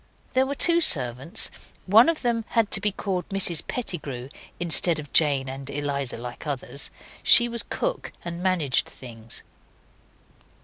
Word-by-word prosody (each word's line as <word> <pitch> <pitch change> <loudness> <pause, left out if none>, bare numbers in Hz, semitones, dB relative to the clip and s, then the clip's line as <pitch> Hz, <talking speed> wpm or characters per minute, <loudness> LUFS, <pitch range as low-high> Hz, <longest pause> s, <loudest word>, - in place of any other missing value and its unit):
There 260 +1 +3
were 280 - -3
two 340 +3 +4
servants. 130 - 0 0.3
One 220 - +6
of 325 -4 -2
them 235 -2 +1
had 225 -3 +1
to 195 - +1
be 210 0 +2
called 185 -2 -3
Mrs 185 -4 0
Pettigrew 145 - -5 0.3
instead 170 -1 +3
of 150 -2 -9
Jane 140 -4 +3
and 135 +1 -7
Eliza 140 -3 -3
like 120 +5 -8
others. 140 0 -3 0.3
She 240 - +7
was 235 -1 -2
cook - - -3
and 170 0 -5
managed 180 -8 +2
things. 115 -3 -11
170 Hz, 145 wpm, -25 LUFS, 135-220 Hz, 0.3 s, She